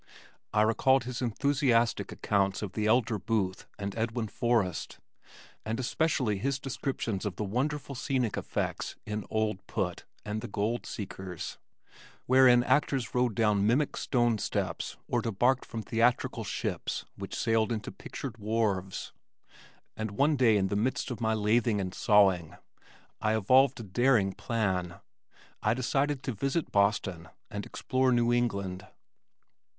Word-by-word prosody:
I 105 Hz, -, +4 dB
recalled 130 Hz, +4 st, +3 dB
his 125 Hz, +1 st, -5 dB
enthusiastic 125 Hz, -1 st, +1 dB
accounts 100 Hz, 0 st, 0 dB
of 100 Hz, -, -4 dB
the 105 Hz, -1 st, 0 dB
elder 110 Hz, -2 st, +2 dB
Booth 95 Hz, -3 st, -1 dB
and 100 Hz, -1 st, -4 dB
Edwin 115 Hz, 0 st, -2 dB
Forrest, 110 Hz, -9 st, 0 dB, 0.7 s
and 110 Hz, +2 st, -3 dB
especially 130 Hz, -5 st, 0 dB
his 135 Hz, +4 st, 0 dB
descriptions 130 Hz, -6 st, -3 dB
of 100 Hz, -4 st, -3 dB
the 105 Hz, -, -3 dB
wonderful 140 Hz, +7 st, -2 dB
scenic 130 Hz, -4 st, -1 dB
effects -, -, -3 dB
in 105 Hz, 0 st, -4 dB
Old 110 Hz, -3 st, 0 dB
Put -, -, -3 dB, 0.2 s
and 105 Hz, +1 st, -3 dB
The -, -, -5 dB
Gold 105 Hz, +4 st, -2 dB
Seekers, 95 Hz, -4 st, -6 dB, 0.7 s
wherein 125 Hz, -1 st, +6 dB
actors 135 Hz, -4 st, +1 dB
rode 125 Hz, -3 st, +1 dB
down 105 Hz, -3 st, +3 dB
mimic 135 Hz, +6 st, +2 dB
stone 120 Hz, -4 st, +1 dB
steps -, -, -3 dB
or -, -, +1 dB
debarked 120 Hz, +5 st, +1 dB
from 115 Hz, -1 st, -6 dB
theatrical 120 Hz, +2 st, +1 dB
ships -, -, -3 dB
which -, -, -6 dB
sailed 115 Hz, 0 st, +1 dB
into 110 Hz, -2 st, -3 dB
pictured 120 Hz, -5 st, -7 dB
wharves, 105 Hz, -3 st, -1 dB, 0.8 s
and 110 Hz, 0 st, -3 dB
one 140 Hz, +9 st, +2 dB
day 120 Hz, -5 st, +4 dB
in 95 Hz, -1 st, +1 dB
the 100 Hz, -, -1 dB
midst 125 Hz, +5 st, 0 dB
of 120 Hz, -, -5 dB
my 110 Hz, -1 st, +2 dB
lathing 110 Hz, +1 st, +2 dB
and 95 Hz, -1 st, -3 dB
sawing, 95 Hz, -7 st, +3 dB, 0.7 s
I 110 Hz, 0 st, +2 dB
evolved 130 Hz, +5 st, +4 dB
a -, -, -5 dB
daring 110 Hz, -1 st, +2 dB
plan 95 Hz, -7 st, -1 dB, 0.7 s
I 110 Hz, +2 st, +2 dB
decided 135 Hz, +2 st, 0 dB
to 130 Hz, -, -2 dB
visit 135 Hz, -, -1 dB
Boston 100 Hz, -4 st, +1 dB, 0.2 s
and 105 Hz, -1 st, -5 dB
explore 130 Hz, 0 st, 0 dB
New 120 Hz, 0 st, +3 dB
England. 100 Hz, -6 st, -1 dB
115 Hz, 140 wpm, -29 LUFS, 100-125 Hz, 0.8 s, wherein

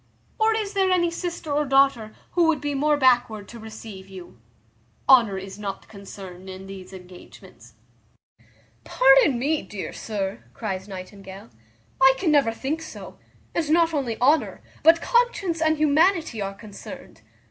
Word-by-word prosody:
or 440 Hz, 0 st, +3 dB
is 420 Hz, -2 st, -3 dB
there 385 Hz, -1 st, +2 dB
any 345 Hz, -2 st, +2 dB
sister 340 Hz, -3 st, -5 dB
or 295 Hz, +1 st, +1 dB
daughter 270 Hz, -6 st, +2 dB, 0.2 s
who 345 Hz, -1 st, +3 dB
would 325 Hz, -2 st, +2 dB
be 290 Hz, -1 st, -3 dB
more 295 Hz, +2 st, +2 dB
backward 240 Hz, -6 st, +2 dB
to 235 Hz, -, -11 dB
receive 215 Hz, -3 st, -10 dB
you? 185 Hz, -2 st, -11 dB, 0.7 s
Honour 230 Hz, -7 st, +5 dB
is 190 Hz, +1 st, -8 dB
not 200 Hz, -2 st, -6 dB
concerned 190 Hz, -2 st, -11 dB
in 190 Hz, 0 st, -9 dB
these 195 Hz, -1 st, -10 dB
engagements." 180 Hz, -, -14 dB, 1.1 s
"Pardon 270 Hz, -, +4 dB
me, 295 Hz, +5 st, 0 dB
dear 205 Hz, -2 st, -7 dB
sir," 205 Hz, -1 st, -4 dB
cries 190 Hz, -3 st, -4 dB
Nightingale, 195 Hz, -, -10 dB, 0.5 s
"I 265 Hz, 0 st, +7 dB
can 335 Hz, -1 st, +1 dB
never 280 Hz, -6 st, +3 dB
think 280 Hz, +8 st, -4 dB
so; 320 Hz, -, -10 dB, 0.3 s
and 320 Hz, -3 st, -1 dB
not 330 Hz, +1 st, +3 dB
only 260 Hz, -7 st, -2 dB
honour, 250 Hz, -7 st, +2 dB, 0.2 s
but 330 Hz, +2 st, +5 dB
conscience 440 Hz, -9 st, +1 dB
and 315 Hz, -1 st, +2 dB
humanity, 310 Hz, -, +2 dB
are 195 Hz, 0 st, -4 dB
concerned. 210 Hz, -1 st, -11 dB
250 Hz, 145 wpm, -24 LUFS, 195-315 Hz, 1.1 s, I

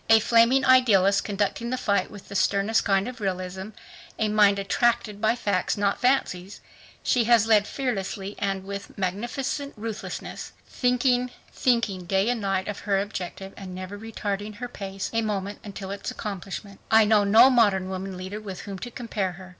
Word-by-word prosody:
A 225 Hz, 0 st, +8 dB
flaming 235 Hz, +4 st, +4 dB
idealist, 200 Hz, -7 st, +5 dB
conducting 210 Hz, +3 st, -2 dB
the 255 Hz, -, -1 dB
fight 200 Hz, -5 st, 0 dB
with 205 Hz, -2 st, -12 dB
the -, -, -9 dB
sternest 200 Hz, +3 st, +2 dB
kind 195 Hz, 0 st, +2 dB
of 250 Hz, -2 st, -8 dB
realism, 190 Hz, 0 st, -3 dB, 0.5 s
a 215 Hz, -1 st, +1 dB
mind 205 Hz, -1 st, +4 dB
attracted 210 Hz, +1 st, 0 dB
by 220 Hz, +1 st, +3 dB
facts, 205 Hz, -6 st, 0 dB
not 200 Hz, -1 st, 0 dB
fancies, 205 Hz, -7 st, 0 dB, 0.4 s
she 240 Hz, -3 st, +2 dB
has 230 Hz, -1 st, +5 dB
led 215 Hz, -2 st, +4 dB
fearlessly 200 Hz, -6 st, -3 dB
and 195 Hz, -1 st, -1 dB
with 200 Hz, +1 st, -7 dB
magnificent 240 Hz, +9 st, -3 dB
ruthlessness. 220 Hz, 0 st, -6 dB
Thinking, 250 Hz, 0 st, +1 dB, 0.2 s
thinking 220 Hz, -7 st, +1 dB
day 195 Hz, +4 st, +1 dB
and 245 Hz, -2 st, -1 dB
night 195 Hz, -1 st, -1 dB
of 210 Hz, -, -4 dB
her 200 Hz, -2 st, +1 dB
objective 195 Hz, -1 st, -5 dB
and 185 Hz, -2 st, -8 dB
never 185 Hz, +2 st, -6 dB
retarding 205 Hz, -1 st, -4 dB
her 245 Hz, +3 st, -5 dB
pace 195 Hz, -4 st, -6 dB
a 230 Hz, -, +2 dB
moment 205 Hz, -2 st, -3 dB
until 195 Hz, -2 st, -7 dB
its 200 Hz, -, -5 dB
accomplishment, 200 Hz, -1 st, -6 dB
I 220 Hz, 0 st, +6 dB
know 210 Hz, -1 st, +4 dB
no 225 Hz, +6 st, +7 dB
modern 205 Hz, -6 st, +3 dB
woman 190 Hz, 0 st, -5 dB
leader 190 Hz, +3 st, -6 dB
with 195 Hz, -4 st, -7 dB
whom 195 Hz, -2 st, -7 dB
to 245 Hz, -, -6 dB
compare 215 Hz, -6 st, -3 dB
her. 185 Hz, +1 st, -12 dB
205 Hz, 170 wpm, -25 LUFS, 195-230 Hz, 0.5 s, A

